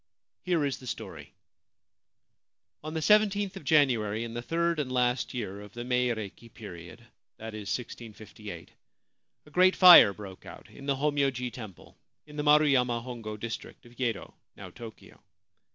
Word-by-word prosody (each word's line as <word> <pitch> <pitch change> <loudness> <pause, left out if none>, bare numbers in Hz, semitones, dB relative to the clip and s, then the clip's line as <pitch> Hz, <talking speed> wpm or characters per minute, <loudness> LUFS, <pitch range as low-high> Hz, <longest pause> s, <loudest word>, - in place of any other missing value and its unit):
Here 170 -5 0
is 140 - -3
the 130 - -12
story: - - -7 0.8
— - - -57
On 155 +1 -6
the 160 - -2
i 210 - +9 0.2
yth 200 -1 -3
of 190 - -9
January 120 -8 +2
in 115 -1 -7
the 120 - -4
third 170 +4 -1
and 135 -4 -3
last 125 0 0
year 100 -4 -5
of 105 0 -13
the 120 - -6
Meireki 120 -3 -2
period 90 +1 -11 0.2
— - - -61
that 110 0 -8
is, 105 -2 -7
1658 110 -3 -10 0.4
— - - -54
a 150 - -18
great 185 +3 +4
fire 180 - +9
broke 100 -2 -11
out - - -13
in 140 - -12
the 140 - +1
Homyo 145 0 +1
ji 125 -1 -5
Temple, 110 -7 -12 0.3
in 150 -1 -14
the 150 - -2
Maruyama 135 -6 +3
Hongo 115 -4 -7
district 115 +2 -7
of 120 0 -17
Yedo, 120 -3 -3 0.2
now 95 -2 -10
Tokio. 115 +3 -13
125 Hz, 170 wpm, -28 LUFS, 110-150 Hz, 0.8 s, i